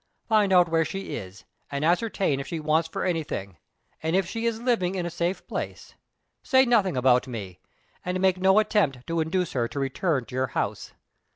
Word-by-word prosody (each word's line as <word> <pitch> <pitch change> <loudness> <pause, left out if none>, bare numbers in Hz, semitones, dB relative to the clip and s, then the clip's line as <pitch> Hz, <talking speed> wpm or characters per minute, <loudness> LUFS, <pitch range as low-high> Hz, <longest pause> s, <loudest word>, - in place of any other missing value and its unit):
"Find 215 -3 +3
out 180 -1 +6
where 165 0 +2
she 195 +3 -5
is, 95 0 -9 0.2
and 140 +1 -2
ascertain 180 -4 +1
if 140 - -5
she 165 - -4
wants 155 +2 +1
for - - -3
anything, 150 - -3 0.4
and 160 +2 0
if 190 -2 +2
she 230 +4 -2
is 225 -1 -1
living 230 -7 0
in 180 -2 -2
a 175 - -3
safe 175 +2 -2
place. - - -6 0.5
Say 265 -2 +4
nothing 205 - +2
about 125 0 +3
me, 100 -8 -7 0.4
and 180 0 -2
make 190 -1 +2
no 190 +2 +4
attempt 195 - +2
to 165 0 -1
induce 175 +2 -1
her 120 -3 0
to 140 - -5
return 135 0 0
to 125 - -14
your 130 +1 0
house. - - -3
170 Hz, 195 wpm, -26 LUFS, 135-190 Hz, 0.5 s, out